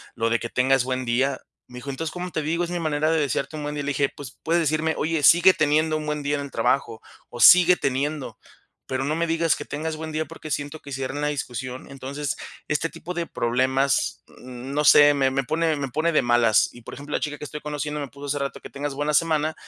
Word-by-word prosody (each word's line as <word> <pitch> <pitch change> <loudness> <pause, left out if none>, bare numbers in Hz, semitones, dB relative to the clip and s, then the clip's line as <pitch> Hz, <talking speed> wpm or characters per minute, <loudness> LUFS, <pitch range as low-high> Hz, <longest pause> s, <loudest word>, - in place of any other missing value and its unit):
lo 115 0 0
de 115 - +1
que 120 - -5
tengas 130 0 +2
buen 130 -1 -2
día. 130 +3 0 0.3
Me 125 - -12
dijo: 140 - -8
"Entonces, 155 +4 -4
¿cómo 180 0 -5
te 155 - -2
digo?, 170 +3 0
es 175 - -7
mi 175 - -2
manera 155 0 0
de 160 - +2
desearte 150 +2 -2
un 150 - -5
buen 150 0 -4
día". 145 - -3
Le 145 - -2
dije: 140 0 +1
'Pues, 135 -3 -10
puedes 170 +1 +2
decirme: 155 +1 0
"Oye, 160 0 0
sigue 175 +5 +7
teniendo 155 +1 +2
un 155 - -5
buen 150 -1 -3
día 145 +1 0
en 140 - -3
el 140 - -6
trabajo' 115 -5 0 0.3
o 120 - -7
'Sigue 180 0 +8
teniendo' 140 +2 -2 0.5
pero 130 0 -2
no 155 +2 0
me 170 0 0
digas 165 -1 +2
que - - -7
tengas 155 +2 -4
buen 160 0 -6
día, 155 +1 -2
porque 155 0 -10
siento 145 +2 -3
que 140 - -11
cierra 135 +1 -4
una 150 0 -1
discusión". 130 -2 -5
Entonces, 140 +1 -4 0.3
este 155 +2 0
tipo 180 - -8
de 170 -1 -2
problemas, 130 +3 0 0.2
no 130 +4 -4
sé, 145 0 +8
me 135 -1 +2
me 135 0 0
pone 160 +1 +1
me 135 -2 -3
pone 160 +6 0
de 150 - +4
malas. 120 -2 +3
Y, 120 - -13
por - - -9
ejemplo, 145 +2 -8
la - - +1
chica 150 -1 -3
que - - -8
estoy 150 +1 -7
conociendo 150 0 -4
me 140 - -4
puso 140 0 -11
hace 145 +1 -1
rato: 140 - -5
"Que - - -10
tengas 140 0 -4
buena 145 +1 -1
semana", 155 0 +2
145 Hz, 245 wpm, -24 LUFS, 135-155 Hz, 0.5 s, Sigue